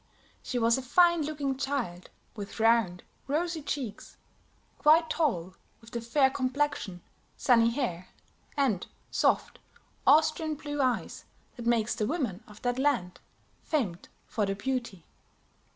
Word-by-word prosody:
She 250 - -3
was 230 +1 +3
a - - -4
fine 345 +6 +4
looking 290 -3 -2
child, 260 -11 -3 0.3
with 205 0 -7
round, 225 -6 +3 0.2
rosy 325 +3 -1
cheeks; 270 -7 -5 0.6
quite 315 +2 +5
tall, 190 - 0 0.3
with 225 0 -16
the 235 - -3
fair 265 +3 +3
complexion, 255 - -1 0.3
sunny 230 -3 +4
hair, 230 -9 -2 0.5
and 250 -10 +1 0.2
soft, - - +1 0.5
Austrian 310 +1 +4
blue 290 -1 -3
eyes 255 -2 -1 0.3
that 235 -2 -6
makes 235 -1 +2
the 210 -2 -1
women 240 - -2
of 210 -1 -15
that 245 +1 0
land 245 -11 0 0.4
famed 210 - -2 0.2
for 210 -2 -1
their 195 - -1
beauty. 235 -5 -3
245 Hz, 130 wpm, -29 LUFS, 215-290 Hz, 0.6 s, quite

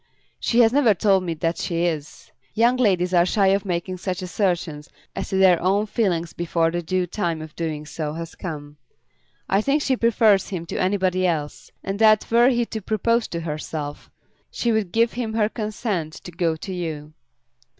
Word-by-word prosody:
"She 240 +1 +3
has 225 0 +4
never 255 -7 +4
told 195 0 +3
me 170 -2 -3
that 165 +2 -2
she 170 0 -1
is. 155 -3 -4 0.2
Young 235 +3 +4
ladies 185 -7 +2
are 175 -1 +5
shy 195 +2 +2
of 195 +1 +1
making 180 0 -3
such 185 0 -4
assertions 175 -5 -2 0.3
as - - -4
to - - -2
their 185 -3 +5
own 195 +4 +2
feelings 180 -7 -1
before 165 -1 0
the 175 +1 -2
due 185 +2 -1
time 165 -4 -3
for 150 - -25
doing 155 -3 -4
so 150 0 -4
has 165 +1 -6
come. 150 -4 -7 0.7
I 195 - +2
think 280 +5 +1
she 265 - +2
prefers 220 -4 +3
him 180 -4 -4
to - - -3
anybody 185 -1 +1
else; 150 -4 -3
and 195 +1 -4
that 215 -1 +4
were 240 +2 +6
he 240 -2 +1
to 220 -1 -6
propose 225 +3 0
to 170 - -4
herself, 150 -2 -5 0.4
she 235 - -1
would 215 -5 0
give 230 +3 +2
him 230 -2 -3
her 215 -2 +3
consent 210 -7 -3
to 175 - -10
go 165 -1 0
to 185 +4 -7
you." 155 -4 -5
185 Hz, 190 wpm, -23 LUFS, 165-215 Hz, 0.7 s, were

